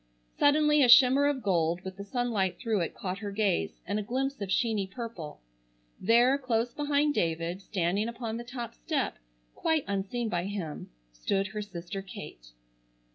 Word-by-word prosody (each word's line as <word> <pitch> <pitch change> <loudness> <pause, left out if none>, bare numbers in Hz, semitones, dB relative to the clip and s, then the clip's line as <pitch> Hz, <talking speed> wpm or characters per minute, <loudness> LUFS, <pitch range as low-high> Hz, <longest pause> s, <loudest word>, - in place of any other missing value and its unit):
Suddenly 300 0 +5
a 250 - +5
shimmer 265 +3 +8
of 280 -3 -1
gold 170 -3 +1
with 190 0 -7
the 200 - -7
sunlight 210 -4 -1
through 225 -4 0
it 170 - -2
caught 185 0 -4
her 205 -1 -4
gaze, 200 -3 0
and 200 +4 -1
a - - -1
glimpse 265 +4 -2
of 200 - -3
sheeny 210 -1 +1
purple. 200 - -7 0.6
There, 245 +4 +4
close 235 -2 0
behind 295 0 +1
David, 170 - -1
standing 195 +2 0
upon 235 -1 -4
the 235 - -5
top 240 -1 -6
step, 300 -5 -2 0.3
quite 320 -3 0
unseen 200 +4 -2
by 175 -4 -1
him, 190 -7 -5 0.2
stood 195 - 0
her 210 +1 -4
sister 195 -1 -6
Kate. - - -10
215 Hz, 165 wpm, -29 LUFS, 190-250 Hz, 0.6 s, shimmer